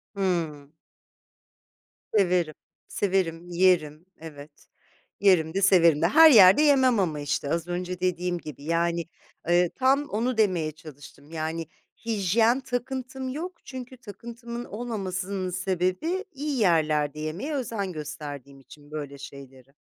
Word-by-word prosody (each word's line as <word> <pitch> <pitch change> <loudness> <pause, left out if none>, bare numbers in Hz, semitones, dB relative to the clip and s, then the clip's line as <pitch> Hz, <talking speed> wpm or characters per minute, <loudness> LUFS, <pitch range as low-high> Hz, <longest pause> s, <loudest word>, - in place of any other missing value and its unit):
Hımm. 160 -7 -2 1.4
Severim, 180 -6 +2 0.3
severim. 175 -3 -1
Yerim, 170 -3 +2
evet. 150 -2 -12 0.5
Yerim 180 -5 +3
de, 195 - -1
severim 170 -5 +5
de. 170 - +4
Her 320 - +8
yerde 195 +2 +8
yemem 265 -6 +4
ama, 160 -6 -1
işte, 145 0 -2
az 165 +2 -1
önce 180 0 -4
dediğim 180 -1 -1
gibi 150 -4 -10
yani, 170 +1 0 0.4
ııı, 175 0 +4
tam 275 +3 +2
onu 230 +3 -1
demeye 180 -8 +1
çalıştım. 150 -1 -14
Yani 160 0 -4 0.4
hijyen 225 +3 +2
takıntım 260 +1 -4
yok, 335 +7 -6
çünkü 255 -1 -8
takıntımın 235 +2 -8
olmamasının 195 -4 -4
sebebi 185 - -1
iyi 285 -2 -3
yerlerde 155 -5 +2
yemeye 170 - -4
özen 225 -7 -3
gösterdiğim 145 -3 -8
için 145 +2 -17
böyle 145 -2 -6
şeyleri. 135 -1 -12
180 Hz, 120 wpm, -26 LUFS, 155-230 Hz, 1.4 s, Her